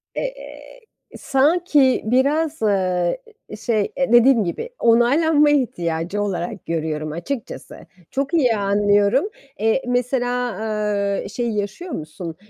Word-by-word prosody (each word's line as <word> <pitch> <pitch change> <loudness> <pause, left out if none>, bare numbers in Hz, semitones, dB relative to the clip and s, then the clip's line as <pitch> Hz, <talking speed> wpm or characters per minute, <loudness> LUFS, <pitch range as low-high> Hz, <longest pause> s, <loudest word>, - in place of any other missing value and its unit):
Eee, - - -7 0.4
sanki 290 -1 +2
biraz, 285 +6 +1
ııı, 185 -4 +1 0.5
şey 215 -4 -1
dediğim 240 -2 +4
gibi 180 - -4
onaylanma 290 +7 +4
ihtiyacı 180 - -1
olarak 180 -2 -4
görüyorum 155 -2 -3
açıkçası. 210 - -6 0.3
Çok 275 +4 -2
iyi 255 -9 +3
anlıyorum. 205 - +2 0.3
Eee, 225 +5 +1
mesela, 245 0 0
ııı, 210 -2 -2
şey 240 -1 -3
yaşıyor 210 - -4
musun? 160 - -6
225 Hz, 100 wpm, -21 LUFS, 200-270 Hz, 0.5 s, dediğim